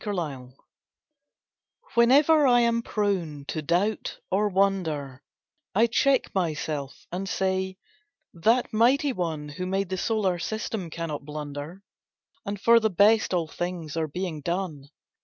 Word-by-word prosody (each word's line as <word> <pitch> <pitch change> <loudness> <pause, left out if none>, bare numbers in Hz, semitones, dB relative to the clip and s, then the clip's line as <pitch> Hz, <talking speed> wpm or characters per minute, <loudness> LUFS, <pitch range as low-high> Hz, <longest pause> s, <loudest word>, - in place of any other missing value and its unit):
PRESUMPTION 145 - -4 1.4
Whenever 285 +5 +5
I 245 -1 +5
am 235 0 +2
prone 185 -11 -2
to 155 - -3
doubt 180 +7 0
or 205 +3 +2
wonder— 165 -9 0 0.5
I 225 +4 +5
check 265 +3 +2
myself, 155 -6 -3
and 190 +2 -4
say, 190 0 -1 0.6
"That 225 +10 +2
mighty 260 +6 +3
One 160 -6 -3
Who 180 +5 -5
made 195 0 -1
the 190 - -2
solar 195 -5 0
system 220 -2 -3
cannot 160 -3 -5
blunder— 150 +4 -7 0.6
And 200 0 -3
for 235 +3 +6
the 220 -1 +1
best 210 +4 +4
all 175 -3 0
things 170 -2 -5
are 160 -1 0
being 165 0 -4
done." 170 -5 -3
185 Hz, 130 wpm, -26 LUFS, 155-215 Hz, 1.4 s, for